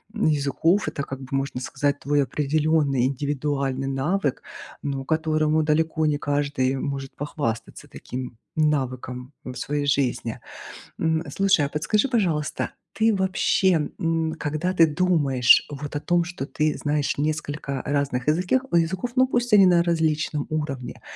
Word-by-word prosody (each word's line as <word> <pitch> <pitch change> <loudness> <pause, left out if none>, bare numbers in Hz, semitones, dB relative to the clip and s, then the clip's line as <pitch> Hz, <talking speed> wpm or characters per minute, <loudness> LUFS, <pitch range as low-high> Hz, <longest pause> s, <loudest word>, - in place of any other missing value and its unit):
м, 215 - 0
языков. 155 +6 +2
Это 140 - -3
как 135 -1 -6
бы 130 - -9
можно 135 -1 -1
сказать 145 +2 -1
твой 145 0 +1
определённый 150 -2 +1
индивидуальный 140 -1 -2
навык, 140 +2 -1 0.4
ну 135 -2 -3
которому 155 0 +1
далеко 155 +1 +1
не 150 -1 +2
каждый 145 -3 0
может 135 -1 -4
похвастаться 145 -6 -4
таким 125 -2 -7 0.2
навыком 130 -3 -1
в 125 -1 -7
своей 145 +3 -2
жизни. 125 -4 0 0.6
М, 160 0 +1
слушай, 195 -6 +3
а - - -4
подскажи 155 - +1
пожалуйста, 170 - 0 0.2
ты 220 0 +3
вообще, 190 -3 +2
м, 165 -1 0
когда 155 +5 -1
ты 165 -2 +6
думаешь 145 -6 +4
вот 145 0 -6
о - - 0
том, 175 +2 +1
что 175 -6 -5
ты 155 0 0
знаешь 145 -1 -1
несколько 145 -2 -2
разных 140 -2 -1
языкех 180 +12 +2
языков, 185 +8 +1
ну 255 0 +4
пусть 245 -2 0
они 195 -2 +8
на 175 -2 +5
различном 155 -3 0
уровне, 150 -5 -4
150 Hz, 140 wpm, -24 LUFS, 140-165 Hz, 0.6 s, они